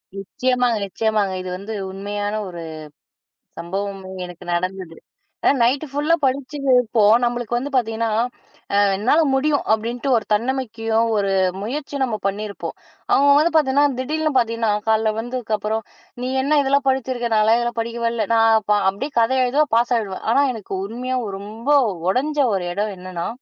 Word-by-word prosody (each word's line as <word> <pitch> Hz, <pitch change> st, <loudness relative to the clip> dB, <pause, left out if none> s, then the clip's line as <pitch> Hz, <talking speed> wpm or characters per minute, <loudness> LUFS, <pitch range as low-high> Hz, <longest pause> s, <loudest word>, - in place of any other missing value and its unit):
நிச்சயமாங்க 245 Hz, +4 st, 0 dB
நிச்சயமாங்க, 210 Hz, -1 st, 0 dB
இது 185 Hz, -, -6 dB
வந்து 200 Hz, +4 st, -7 dB, 0.2 s
உண்மையான 205 Hz, +1 st, -4 dB
ஒரு 175 Hz, -2 st, -7 dB, 1.0 s
சம்பவமும் 190 Hz, +1 st, -5 dB
எனக்கு 180 Hz, 0 st, -11 dB
நடந்தது. 185 Hz, -1 st, -3 dB, 0.5 s
அ, -, -, +7 dB
நைட்டு 270 Hz, +6 st, +1 dB
ஃபுல்லா 295 Hz, +4 st, +2 dB
படிச்சி 270 Hz, +2 st, -2 dB, 0.2 s
இருப்போம். 220 Hz, -3 st, +4 dB
நம்பளுக்கு 240 Hz, 0 st, -1 dB
வந்து 275 Hz, +4 st, -4 dB
பாத்தீங்கன்னா, 225 Hz, -2 st, 0 dB, 0.6 s
"அ, -, -, +3 dB, 0.2 s
என்னால 245 Hz, +10 st, +3 dB
முடியும்!" 285 Hz, +2 st, +2 dB
அப்படின்னுட்டு, 235 Hz, +5 st, -2 dB
ஒரு 220 Hz, -, -3 dB
தன்னம்பிக்கையும் 225 Hz, -1 st, 0 dB
ஒரு 200 Hz, -1 st, 0 dB, 0.3 s
முயற்சியும் 280 Hz, +4 st, -3 dB
நம்ம 220 Hz, -4 st, -3 dB
பண்ணியிருப்போம். 200 Hz, +1 st, -5 dB, 0.4 s
அவுங்க 280 Hz, +1 st, +5 dB
வந்து 325 Hz, +2 st, +2 dB
பாத்தீங்கன்னா 285 Hz, -1 st, +3 dB
திடீர்னு 310 Hz, +2 st, -1 dB
பாத்தீங்கன்னா, 230 Hz, -2 st, 0 dB, 0.2 s
காலையில 220 Hz, 0 st, +2 dB
வந்ததுக்கு 240 Hz, -2 st, -2 dB
அப்புறம், 215 Hz, +2 st, -2 dB, 0.4 s
"நீ 255 Hz, -, -2 dB
என்ன 295 Hz, +1 st, +3 dB
இதெல்லாம் 275 Hz, 0 st, +1 dB
படிச்சிருக்க! 255 Hz, -2 st, -1 dB
நான்லாம் 215 Hz, +2 st, +4 dB
இதெல்லாம் 240 Hz, -1 st, -2 dB
படிக்கவேல்ல. 230 Hz, -1 st, -2 dB
நான் 225 Hz, -1 st, +4 dB
ப -, -, +4 dB, 0.2 s
அப்படியே 265 Hz, +10 st, -4 dB
கதை 235 Hz, +3 st, +2 dB
எழுதுவேன். 285 Hz, +4 st, +1 dB
பாஸ் 240 Hz, +2 st, +2 dB
ஆயிடுவேன்." 200 Hz, -4 st, -5 dB
ஆனா 280 Hz, +4 st, +4 dB
எனக்கு 215 Hz, -4 st, -8 dB
உண்மையா, 250 Hz, +4 st, -3 dB, 0.2 s
ரொம்ப 220 Hz, +6 st, -7 dB, 0.4 s
ஒடைஞ்ச 295 Hz, +8 st, 0 dB, 0.2 s
ஒரு 180 Hz, -, -2 dB
இடம் 205 Hz, +1 st, -2 dB
என்னான்னா, 180 Hz, -2 st, -5 dB
230 Hz, 145 wpm, -21 LUFS, 205-260 Hz, 1.0 s, அ